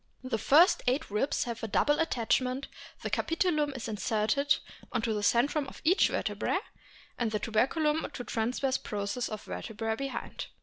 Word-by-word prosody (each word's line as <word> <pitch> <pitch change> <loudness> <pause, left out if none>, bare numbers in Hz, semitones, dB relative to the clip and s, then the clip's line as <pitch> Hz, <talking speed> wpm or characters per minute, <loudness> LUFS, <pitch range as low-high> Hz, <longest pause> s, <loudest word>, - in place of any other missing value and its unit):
The 255 -4 -2
first 320 - +5
eight 255 -3 +1
ribs 215 +8 +1
have 235 -1 -5
a 225 - -2
double 295 +8 +2
attachment, 255 -2 0 0.4
the - - -3
capitulum 330 -4 +1
is 245 - -5
inserted 225 +6 +1 0.4
on 230 -2 -1
to 230 - +1
centrum 275 +7 +2
of - - -10
each 350 +5 +5
vertebra, - - -1 0.6
and 235 -2 +1
the 215 - 0
tuberculum 300 +9 +1
to 245 - -5
transverse 245 +4 0
process 205 +4 -3
of 215 -1 -6
vertebra 220 0 -3
behind. 275 +3 -5
250 Hz, 150 wpm, -30 LUFS, 220-290 Hz, 0.6 s, first